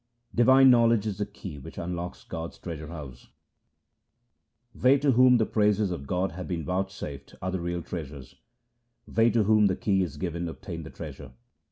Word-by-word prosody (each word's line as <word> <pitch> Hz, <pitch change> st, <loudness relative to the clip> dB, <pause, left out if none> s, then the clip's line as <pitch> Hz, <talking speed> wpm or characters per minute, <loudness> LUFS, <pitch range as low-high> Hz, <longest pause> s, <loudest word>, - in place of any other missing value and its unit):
Divine 130 Hz, +2 st, +6 dB
knowledge 115 Hz, -3 st, +4 dB
is 105 Hz, -2 st, -3 dB
the 105 Hz, -, -1 dB
key 95 Hz, -7 st, -9 dB
which 65 Hz, -, -11 dB
unlocks 85 Hz, 0 st, -5 dB
God's 80 Hz, 0 st, -6 dB
treasure 80 Hz, -3 st, -7 dB
house: 70 Hz, -7 st, -9 dB, 0.7 s
— -, -, -53 dB, 0.7 s
They 130 Hz, +5 st, +4 dB
to 140 Hz, 0 st, +2 dB
whom 125 Hz, 0 st, +6 dB
the 110 Hz, -, +2 dB
praises 105 Hz, -2 st, +2 dB
of 70 Hz, -6 st, -5 dB
God 90 Hz, +3 st, 0 dB
have 90 Hz, +2 st, -7 dB
been 85 Hz, -5 st, -3 dB
vouchsafed 90 Hz, -6 st, -4 dB
are 95 Hz, -1 st, -3 dB
the 95 Hz, -, -2 dB
real 85 Hz, 0 st, -3 dB
treasures; 70 Hz, -6 st, -7 dB, 0.7 s
They 115 Hz, +1 st, +3 dB
to 115 Hz, 0 st, +2 dB
whom 105 Hz, 0 st, +4 dB
the 95 Hz, -, 0 dB
key 95 Hz, -2 st, +1 dB
is 85 Hz, -6 st, -3 dB
given 85 Hz, -1 st, -3 dB
obtain 85 Hz, 0 st, -7 dB
the 80 Hz, -, -9 dB
treasure. 75 Hz, -7 st, -9 dB
95 Hz, 180 wpm, -27 LUFS, 85-110 Hz, 0.7 s, Divine